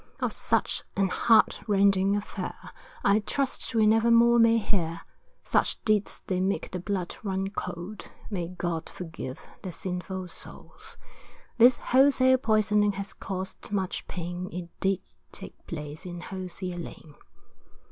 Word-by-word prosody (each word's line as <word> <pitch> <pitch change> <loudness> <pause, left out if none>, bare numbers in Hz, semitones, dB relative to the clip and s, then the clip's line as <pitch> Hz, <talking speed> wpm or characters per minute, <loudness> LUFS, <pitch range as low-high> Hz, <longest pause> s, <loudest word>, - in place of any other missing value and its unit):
Of - - -1
such - - +1
an 195 -1 +2
heartrending 200 -2 +3
affair, 205 0 -5 0.3
I 200 +2 +4
trust 255 +2 -1
we 220 -1 +5
never 225 +2 +4
more 235 +1 +6
may 230 0 +6
hear, 170 -6 -1 0.4
Such - - +2
deeds 215 -2 +1
they 185 -1 -1
make 195 +2 -1
the 180 - -3
blood 185 -1 -3
run 195 -2 -2
cold, 180 +2 -6 0.2
May 175 -4 -2
God 175 -2 -3
forgive 160 -7 -7 0.2
their 185 - -5
sinful 185 +1 -5
souls. - - -11 0.6
This 245 +1 +7
wholesale 260 0 +4
poisoning 210 -3 +3
has 195 0 -6
caused 190 +1 -6
much 190 -3 -2
pain 175 +1 -5
It 175 0 -6
did 195 -1 +1 0.3
take - - -10
place 150 0 -6
in 175 -1 -6
Hosier 185 -1 -5
Lane. 160 -2 -9
195 Hz, 135 wpm, -27 LUFS, 180-215 Hz, 0.6 s, This